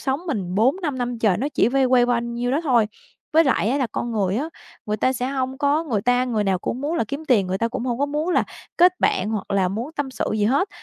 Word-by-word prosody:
sống 270 +3 -1
mình 195 - -3
4-5 270 - +1
năm 245 -1 -2
trời 205 -6 +2
nó 280 - -1
chỉ - - +3
vay 270 +1 +2
quay 250 -1 +4
quanh 235 -1 -1
nhiêu 245 +1 -1
đó 285 +5 +1
thôi. 240 -8 +3 0.5
Với 325 +1 +5
lại 245 -5 +2
á, 275 - +1
là 260 - +1
con 240 -1 -3
người 195 -2 0
á, 300 +6 -2 0.4
người 210 0 -1
ta 260 - +1
sẽ 250 0 -2
hông 265 -1 -3
có 295 +3 +1
người 220 -9 -1
ta 245 +1 +2
người 220 -4 -1
nào 190 -2 +1
cũng 250 - -4
muốn 310 +4 -2
là 230 - +1
kiếm 285 +3 -5
tiền, 205 -7 +4
người 190 +1 -2
ta 230 - 0
cũng 250 +1 -4
hông 245 -1 -2
có 285 - +1
muốn 300 +4 -2
là - - +2 0.3
kết 360 +1 +4
bạn 195 +4 +1
hoặc 210 -3 -4
là 190 -2 +2
muốn 235 - -4
tâm 280 -2 -2
sự - - -3
gì 210 -1 +1
hết. 280 - +2
250 Hz, 275 wpm, -22 LUFS, 220-280 Hz, 0.5 s, Với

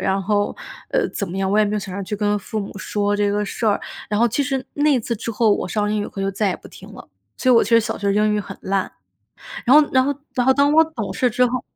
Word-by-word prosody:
然 195 +1 0
后， 205 +1 0 0.3
呃， - - +1
怎 200 -5 -4
么 190 - -5
样， 195 0 0
我 210 - +2
也 215 - +5
没 210 - -2
有 - - 0
想 190 -2 -6
着 200 - -4
去 210 +2 -4
跟 205 0 0
父 215 +2 -5
母 200 -1 -6
说 205 +1 -1
这 205 0 +1
个 210 0 0
事 220 +3 -3
儿。 205 - +3 0.3
然 210 0 0
后 235 - +4
其 260 +5 0
实， 270 -2 -2
那 295 +1 +2
一 - - +3
次 235 +1 -3
之 230 +1 -5
后 215 -2 +3
我 - - -4
上 210 +2 -1
英 215 - 0
语 - - -5
课 195 - -6
就 195 - 0
再 200 +1 0
也 180 - -2
不 - - -15
听 - - -13
了， - - -12 0.3
所 255 - +1
以 - - +6
我 230 - +6
其 - - -3
实 230 0 +6
小 - - -4
学 200 0 0
英 210 0 +2
语 210 - 0
很 - - -9
烂， 195 0 -1 0.8
然 255 - +6
后 300 -1 +6
然 260 -1 +4
后 285 - 0 0.2
然 250 -1 +1
后 265 - +5
当 285 +1 +3
我 320 +1 +7
懂 230 -12 -5
事 250 - +1
之 250 +3 +2
后 250 0 -3
210 Hz, 325 characters per minute, -21 LUFS, 200-245 Hz, 0.8 s, 我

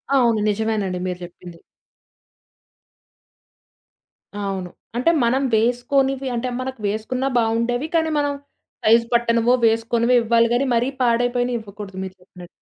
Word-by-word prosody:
అవును. 235 -4 +3
నిజమేనండి 205 -3 -1
మీరు 180 0 -4
చెప్పింది. 170 -1 -13 2.8
అవును. 195 -3 -3 0.3
అంటే 255 +8 +3
మనం 255 +4 +2
వేసుకొనివి 265 +4 +1
అంటే 250 +2 -2
మనకు 260 -1 -5
వేసుకున్నా 220 +6 -2
బావుండేవి. 235 +4 0
కానీ, 320 -1 +2
మనం 290 0 0 0.5
సైజ్ 230 +2 +5
పట్టనవో, 235 0 +3
వేసుకోనివో 230 +2 +1
ఇవ్వాలి 230 0 +3
గానీ, 250 +3 +2
మరీ 240 +3 +1
పాడైపోయినయి 245 0 +1
ఇవ్వకూడదు 200 -2 -10
మీరు 190 0 -7
చెప్పినట్టు. 180 -1 -13
235 Hz, 115 wpm, -21 LUFS, 210-250 Hz, 2.8 s, సైజ్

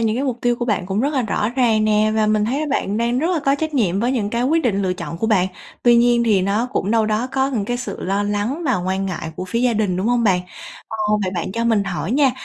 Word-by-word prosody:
những 225 -1 +1
cái 270 - -1
mục 250 -3 -2
tiêu 240 0 +1
của 240 - -2
bạn 205 -6 -1
cũng 195 +2 -1
rất 285 +4 0
là 265 - +1
rõ 210 -1 -1
ràng 235 -4 +2
nè, 215 0 +2
và 215 -1 +2
mình 215 0 +2
thấy 260 +7 -1
là 310 - -2
bạn 210 -6 -1
đang 235 +2 0
rất 315 - 0
là 325 - 0
có 275 -1 +2
trách 315 +1 -3
nhiệm 195 -6 +1
với 245 +3 +1
những 210 -5 -1
cái 235 +1 -1
quyết 320 +5 +2
định, 200 -5 0
lựa 185 -1 0
chọn 170 -2 -6
của 225 - -1
bạn. 195 -5 +3 0.4
Tuy 240 -1 +5
nhiên 240 0 +4
thì 205 -5 +3
nó 205 +5 0
cũng 195 - -1
đâu 225 -1 +2
đó 215 +3 0
có 265 0 +1
những 225 -7 -1
cái 245 +4 -2
sự 245 - -6
lo 195 +2 0
lắng 205 +10 -2
và 255 -6 +2
quan 190 +2 -2
ngại 170 -3 -4
của 185 - -4
phía 230 +6 -2
gia 245 -1 +2
đình, 210 -5 0
đúng 190 +4 -1
hông 240 -1 +2
bạn? 185 -3 +3 0.5
Ờ, 220 - -5 0.3
vậy 185 - -1
bạn 175 +1 -3
cho 230 +3 -2
mình 220 -4 +2
hỏi 195 +1 -3
nha, 275 -1 +4
220 Hz, 300 wpm, -20 LUFS, 200-245 Hz, 0.5 s, Tuy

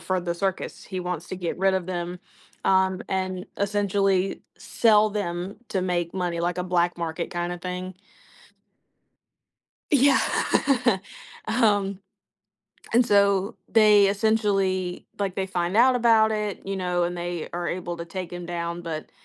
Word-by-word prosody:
for 185 +2 -1
the 170 0 -2
circus. 190 +1 -3
He 185 -1 -6
wants 180 -2 -4
to 185 - -5
get 175 -2 -3
rid 190 +1 +2
of 185 -2 -1
them, 175 0 -4 0.5
um, 190 -1 +2
and 185 -1 -2
essentially 200 -1 +1
sell 215 -2 +3
them 190 -2 -3
to 190 - -1
make 175 -2 -1
money, 175 -3 -2
like 175 +1 -1
a 180 - -1
black 175 -1 +1
market 170 0 -3
kinda 175 0 -3
thing. 180 +1 -5 2.0
Yeah. 275 -1 +5 1.3
um, 205 -4 +2 0.9
and 240 +1 +5
so 200 0 +3
they 210 -2 +6
essentially 195 -4 0
like, 195 -2 -1
they 190 0 -2
find 180 +1 -1
out 250 +2 +6
about 225 -2 +4
it, 210 -2 -3
you 195 0 -2
know, 180 -1 0
and 175 +1 -3
they 175 -1 -4
are 175 0 -2
able 175 -1 -4
to 170 - -6
take 180 0 -6
him 175 -1 -6
down, 170 0 -4
but, 160 -2 -5
185 Hz, 145 wpm, -25 LUFS, 175-200 Hz, 2.0 s, they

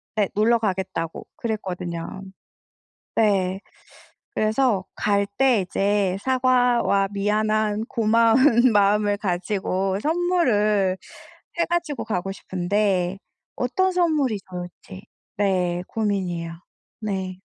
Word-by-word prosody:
네. 205 -3 +1
놀러 230 +3 +4
가겠다고 185 -5 -3
그랬거든요. 185 -5 -4 0.9
네. 195 -3 +2 0.8
그래서 215 -3 +1
갈 200 -1 +1
때 255 -6 +4
이제 195 0 0
사과와 250 -6 +2
미안한 215 +1 0
고마운 230 +2 +4
마음을 205 0 +3
가지고 190 0 -1
선물을 225 - +2 0.6
해 340 - +3
가지고 335 -4 -2
가고 195 -2 -2
싶은데 190 0 -1 0.4
어떤 375 +10 +1
선물이 305 - +1
좋을지. 180 +2 -9 0.3
네. 180 -3 0
고민이에요. 185 -6 -2 0.5
네. 190 -2 -4
205 Hz, 210 characters per minute, -23 LUFS, 190-230 Hz, 0.9 s, 놀러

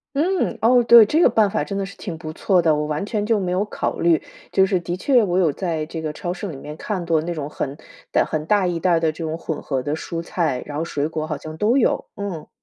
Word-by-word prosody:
嗯， 345 +6 0
哦， 245 +2 +6
对， 235 -1 +9
这 305 +10 +2
个 - - +6
办 210 -3 +3
法 - - 0
真 195 - -4
的 195 - -1
是 195 - -10
挺 170 -4 -6
不 155 -1 -7
错 185 +3 +2
的， 160 -1 +4
我 150 0 -1
完 150 +5 -2
全 210 0 -2
就 225 -2 +2
没 180 -2 -2
有 185 +2 +1
考 - - -3
虑。 170 -2 +4 0.3
就 190 - +4
是 190 -2 +1
的 175 +1 -4
确， 250 +3 +3
我 180 -3 0
有 175 -5 +3
在 165 -3 -2
这 160 +1 -6
个 155 -1 -3
超 175 +3 -4
市 185 +3 -6
里 165 - -6
面 150 +2 -8
看过 170 -6 -1
那 170 +2 -4
种 150 -4 -4
很 145 -1 -4 0.3
袋 - - +3
很 155 -1 -2
大 205 -1 +3
一 175 -2 -1
袋 180 - +1
儿 165 - +3
的 165 -1 +1
这 165 +2 -7
种 160 0 -3
混 160 -2 -4
合 135 -3 -2
的 145 +3 -1
蔬 165 +1 -5
菜， 160 -7 -1
然 145 - -7
后 155 - -1
水 150 -3 -2
果 155 -1 -4
好 150 -2 -3
像 155 +2 -8
都 220 +8 +2
有， 255 - +1
嗯。 190 -7 -5
170 Hz, 300 characters per minute, -22 LUFS, 155-200 Hz, 0.3 s, 对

